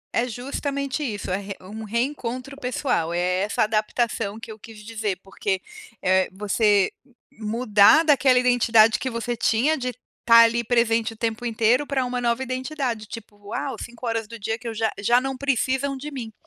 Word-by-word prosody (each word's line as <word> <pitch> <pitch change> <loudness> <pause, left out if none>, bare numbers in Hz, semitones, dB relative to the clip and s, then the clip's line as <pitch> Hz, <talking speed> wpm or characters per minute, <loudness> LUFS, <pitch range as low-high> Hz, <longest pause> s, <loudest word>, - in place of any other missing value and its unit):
É 240 +2 +1
justamente 275 +4 -3
isso 205 -7 -4
é 185 - +1
re 200 0 -7
um 215 +4 -9
reencontro 255 +3 -3
pessoal. 250 - -1
É 180 +1 0
essa 205 +1 +1
adaptação 215 0 -1
que 225 - -9
eu 215 - -11
quis 215 -1 -12
dizer 215 -4 -3
porque, 195 0 -2 0.4
eh, 185 0 +3
você 205 0 +2 0.5
mudar 220 +6 +4
daquela 270 -4 +4
identidade 230 -3 +4
que 260 - -2
você 230 0 -3
tinha 240 +6 +2
de 255 -3 -3 0.3
tá 230 0 +7
ali 235 +1 +2
presente 230 -1 +1
o 225 - -18
tempo 225 +1 -2
inteiro 235 +5 +2
pra 265 -3 0
uma 250 0 -3
nova 235 +2 0
identidade, 255 -3 -3
tipo 225 -2 -10
uau, 260 +5 -3
5 240 +1 -8
horas 225 -2 -2
do 230 +1 -9
dia 225 +2 -2
que 240 - -8
eu 225 - -3
já 220 0 0
já 240 +4 +4
não 270 +1 -3
precisam 270 +1 0
de 295 +3 -7
mim. 230 -5 -7
230 Hz, 180 wpm, -23 LUFS, 215-255 Hz, 0.5 s, tá